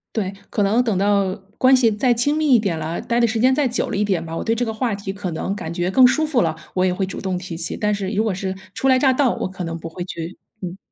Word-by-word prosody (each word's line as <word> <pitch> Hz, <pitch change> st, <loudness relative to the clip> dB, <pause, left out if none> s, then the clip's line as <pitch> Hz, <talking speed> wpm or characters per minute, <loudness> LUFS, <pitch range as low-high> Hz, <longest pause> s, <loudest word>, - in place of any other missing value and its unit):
对， 200 Hz, -4 st, -1 dB, 0.2 s
可 205 Hz, -, 0 dB
能 220 Hz, +5 st, +3 dB
等 220 Hz, -6 st, 0 dB
到 200 Hz, -1 st, +2 dB, 0.2 s
关 260 Hz, +1 st, +6 dB
系 240 Hz, -3 st, +4 dB
再 240 Hz, +4 st, +2 dB
亲 245 Hz, +6 st, +1 dB
密 310 Hz, -1 st, +1 dB
一 -, -, +5 dB
点 195 Hz, -6 st, -1 dB
了， 160 Hz, +2 st, -3 dB
待 235 Hz, 0 st, 0 dB
的 235 Hz, -, +4 dB
时 225 Hz, 0 st, -1 dB
间 255 Hz, +3 st, +4 dB
再 285 Hz, 0 st, +2 dB
久 245 Hz, -, -1 dB
了 -, -, -2 dB
一 205 Hz, -, +2 dB
点 185 Hz, -5 st, 0 dB
吧， 165 Hz, 0 st, -6 dB
我 -, -, -3 dB
对 225 Hz, -, +1 dB
这 245 Hz, +2 st, 0 dB
个 220 Hz, -, -3 dB
话 220 Hz, -1 st, -1 dB
题 200 Hz, -1 st, -5 dB
可 195 Hz, -3 st, -4 dB
能 165 Hz, +4 st, -2 dB
感 160 Hz, -5 st, -5 dB
觉 175 Hz, +1 st, -1 dB
更 255 Hz, +5 st, +7 dB
舒 310 Hz, +5 st, +2 dB
服 300 Hz, -6 st, +1 dB
了， 160 Hz, -2 st, 0 dB, 0.2 s
我 185 Hz, 0 st, +2 dB
也 185 Hz, -, +2 dB
会 190 Hz, +1 st, -1 dB
主 190 Hz, -, -6 dB
动 190 Hz, -1 st, -2 dB
提 180 Hz, -1 st, -6 dB
起， 165 Hz, 0 st, -4 dB
但 210 Hz, 0 st, +1 dB
是 200 Hz, -2 st, -2 dB
如 215 Hz, 0 st, +1 dB
果 220 Hz, -3 st, 0 dB
是 190 Hz, 0 st, -3 dB, 0.2 s
初 270 Hz, -, -1 dB
来 260 Hz, -1 st, +5 dB
乍 265 Hz, 0 st, +4 dB
到， 255 Hz, -2 st, +2 dB
我 -, -, -2 dB
可 185 Hz, -1 st, -7 dB
能 165 Hz, -1 st, -4 dB
不 165 Hz, 0 st, -7 dB
会 175 Hz, +2 st, -6 dB
去 170 Hz, 0 st, -6 dB, 0.2 s
嗯。 180 Hz, 0 st, -5 dB
200 Hz, 330 characters per minute, -21 LUFS, 180-240 Hz, 0.2 s, 更